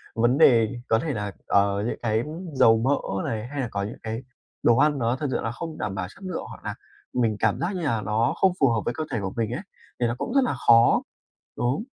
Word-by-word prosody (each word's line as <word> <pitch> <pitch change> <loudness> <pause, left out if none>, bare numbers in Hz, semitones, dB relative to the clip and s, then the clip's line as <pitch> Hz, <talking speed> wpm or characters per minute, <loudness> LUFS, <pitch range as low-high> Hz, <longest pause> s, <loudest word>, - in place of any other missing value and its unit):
vấn 120 +4 +3
đề 120 -5 +5
có 110 0 +3
thể 150 +1 -2
là, 105 -2 -3 0.2
ờ, 100 0 +2
những - - -3
cái 110 0 +1 0.3
dầu 115 -4 +5
mỡ 135 +5 +2 0.3
này, 110 0 -3
hay 140 +1 -4
là 125 - -2
có 100 0 -2
những 105 +4 -6
cái 110 +3 -4 0.4
đồ 120 0 +5
ăn 150 -1 +3
nó 120 +1 +1
thực 145 +2 -3
sự - - 0
là 115 - -2
không 160 +4 -6
đảm 95 - -3
bảo 90 -2 -3
chất 195 - -16
lượng 185 -3 -4
hoặc - - -11
là - - -4 0.4
mình 115 -4 +1
cảm 110 -2 +1
giác 185 +3 -1
như 180 - -3
là 115 -8 0
nó 110 +3 +1
không 190 -1 +4
phù 135 -3 +5
hợp 115 -2 +1
với 120 - 0
cơ 155 - -3
thể 115 - -1
của 95 -1 -4
mình 115 -1 0
ấy, 125 - -3 0.4
thì 120 - +2
nó 120 - -2
cũng 235 - -4
rất 275 - +5
là 245 - 0
khó 115 0 +6 0.5
đúng. 125 - 0
120 Hz, 255 wpm, -25 LUFS, 110-140 Hz, 0.5 s, khó